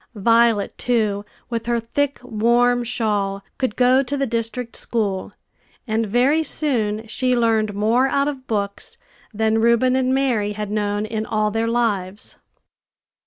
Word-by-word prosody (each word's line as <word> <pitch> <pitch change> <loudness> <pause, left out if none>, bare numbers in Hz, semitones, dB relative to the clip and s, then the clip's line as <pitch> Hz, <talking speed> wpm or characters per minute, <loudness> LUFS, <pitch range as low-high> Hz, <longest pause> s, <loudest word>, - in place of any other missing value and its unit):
Violet 230 0 +3
too, 215 -4 0 0.3
with 230 0 -3
her 240 -1 +1
thick, 280 +5 -1
warm 240 +1 +2
shawl, 205 -4 -1 0.2
could 260 -5 -1
go 255 +1 +4
to 280 +2 -3
the 275 - +1
district 230 0 -3
school; 205 -5 -1 0.5
and 220 -1 0
very 255 +9 +3
soon 225 -9 -1
she 250 +3 0
learned 220 -3 +1
more 225 +6 +2
out 280 +1 +1
of 270 -3 -5
books 205 - -3 0.3
than 220 0 +1
Reuben 235 +2 +3
and 260 0 +1
Mary 245 -6 +1
had 210 -1 -5
known 205 0 -1
in 215 0 -3
all 215 -1 0
their 225 +1 0
lives. 210 -5 -1
230 Hz, 145 wpm, -21 LUFS, 210-250 Hz, 0.5 s, go